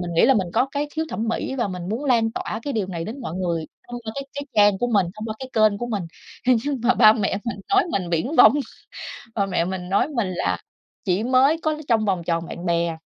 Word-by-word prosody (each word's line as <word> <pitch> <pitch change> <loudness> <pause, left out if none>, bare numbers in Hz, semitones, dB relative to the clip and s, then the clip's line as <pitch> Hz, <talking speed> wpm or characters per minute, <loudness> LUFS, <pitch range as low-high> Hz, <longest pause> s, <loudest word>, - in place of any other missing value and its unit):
mình 175 -1 -4
nghĩ - - +4
là 270 - +5
mình 195 -6 +1
có 240 +4 +3
cái 290 +1 -1
khiếu 320 0 0
thẩm 225 -4 -3
mỹ, 245 - -2
và 235 -5 0
mình 180 -2 -5
muốn 230 +8 -3
lan 230 -4 +2
tỏa 220 - -4
cái 285 - -3
điều 215 -6 -1
này 170 -3 -4
đến 230 +8 -6
mọi 170 -10 -5
người 170 -3 -2 0.2
thông 245 0 -6
qua 220 - -5
cái 275 - -4
cái 285 - -3
trang 205 -2 +5
của 245 - 0
mình, 205 -6 +2
thông 215 - -7
qua 220 - -4
cái 260 -1 -7
kênh 215 -2 +3
của 240 - -3
mình. 215 -5 -2 0.4
À, 255 - +5
nhưng 285 -3 -2
mà 250 +1 +4
ba 215 -3 +8
mẹ 200 -3 -1
mình 235 -4 -3
nói 395 0 +4
mình 180 -3 -1
viển 175 - -1
vông, - - +9 0.8
ba 200 -2 +1
mẹ 180 -3 0
mình 180 0 -4
nói 200 +8 +2
mình 235 -10 -1
là 180 - -1 0.5
chỉ 190 +1 +1
mới 260 +5 +4
có 310 -1 +1
trong 225 -3 +3
vòng 185 -4 0
tròn 165 0 -1
bạn 170 - -7
bè. 170 -1 +1
215 Hz, 260 wpm, -23 LUFS, 185-250 Hz, 0.8 s, vông